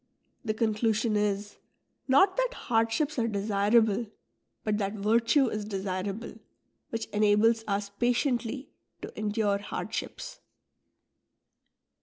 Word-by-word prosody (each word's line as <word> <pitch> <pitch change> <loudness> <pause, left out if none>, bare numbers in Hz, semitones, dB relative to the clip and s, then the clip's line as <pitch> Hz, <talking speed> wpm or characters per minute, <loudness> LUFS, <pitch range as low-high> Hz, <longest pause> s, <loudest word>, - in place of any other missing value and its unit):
The 215 -3 -1
conclusion 220 0 +1
is, 205 0 -1 0.5
not 330 +9 +5
that - - 0
hardships 240 +6 0
are 230 - +1
desirable, 210 +1 +2 0.6
but 210 -1 0
that 200 0 -1
virtue 230 +6 +3
is 215 -1 -3
desir 190 -2 -3
able, 205 +4 -6 0.5
which 225 -1 -3
enables 215 +2 +3
us 200 0 -2
patiently 245 +3 -1 0.3
to - - -8
endure 210 -1 0
hardships. 205 - -5
215 Hz, 105 wpm, -28 LUFS, 205-235 Hz, 0.6 s, not